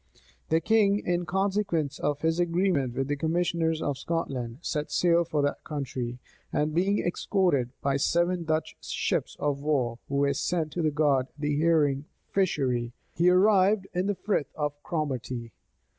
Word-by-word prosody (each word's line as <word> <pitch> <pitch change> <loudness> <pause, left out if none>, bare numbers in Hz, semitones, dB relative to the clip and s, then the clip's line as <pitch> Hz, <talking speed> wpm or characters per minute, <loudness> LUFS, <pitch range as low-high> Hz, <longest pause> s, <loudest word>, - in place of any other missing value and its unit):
The 160 - +3
king, 205 +2 +3
in 175 -3 -1
consequence 190 -6 0
of 145 0 -1
his 160 +1 +1
agreement 170 -7 +1
with 135 0 -1
the 145 - 0
commissioners 165 +1 0
of 140 -2 -2
Scotland, 130 -8 -3
set 150 -3 -2
sail 170 -1 +3
for 150 -3 -1
that 145 - -1
country; 130 -5 -4 0.3
and 150 +1 0
being 190 +5 +2
escorted 175 -7 +1
by 140 0 +2
seven 175 +4 +1
Dutch 155 0 -1
ships - - -1
of 145 -1 -1
war, 130 -6 0
who 140 - -2
were 140 0 +2
sent 160 +2 -1
to 160 0 0
guard 145 -4 +2
the 150 0 -1
herring 150 -4 +2 0.3
fishery, 130 -11 0 0.2
he 175 +2 +4
arrived 195 +1 +4
in 180 +2 0
the 205 - 0
Frith 190 -5 -1
of 150 -2 -1
Cromarty. 130 -7 -3
155 Hz, 155 wpm, -27 LUFS, 140-175 Hz, 0.3 s, he